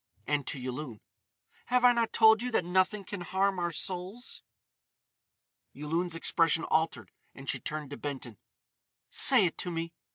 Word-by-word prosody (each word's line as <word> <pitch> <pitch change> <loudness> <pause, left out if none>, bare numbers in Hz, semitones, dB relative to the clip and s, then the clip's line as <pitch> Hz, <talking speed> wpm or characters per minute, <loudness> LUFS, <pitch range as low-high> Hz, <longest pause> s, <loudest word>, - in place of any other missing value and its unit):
And 145 -2 -1
to 135 - -4
Yulun: 125 -2 -6 0.7
"Have 250 0 +3
I 245 - +7
not 235 -1 0
told 220 0 +6
you 250 - -2
that 180 - +1
nothing 185 +3 +1
can 195 0 -7
harm 190 +2 0
our 175 0 -1
souls?" 185 +8 -6 1.3
Yulun's 165 +4 -2
expression 165 0 +1
altered 160 +1 -1 0.2
and 135 0 -11
she - - -1
turned 150 -2 -5
to 145 - -6
Benton: 130 -7 -6 0.7
"Say 245 -8 +6
it 170 - -3
to 180 - -2
me!" 165 0 -4
170 Hz, 155 wpm, -30 LUFS, 150-195 Hz, 1.3 s, I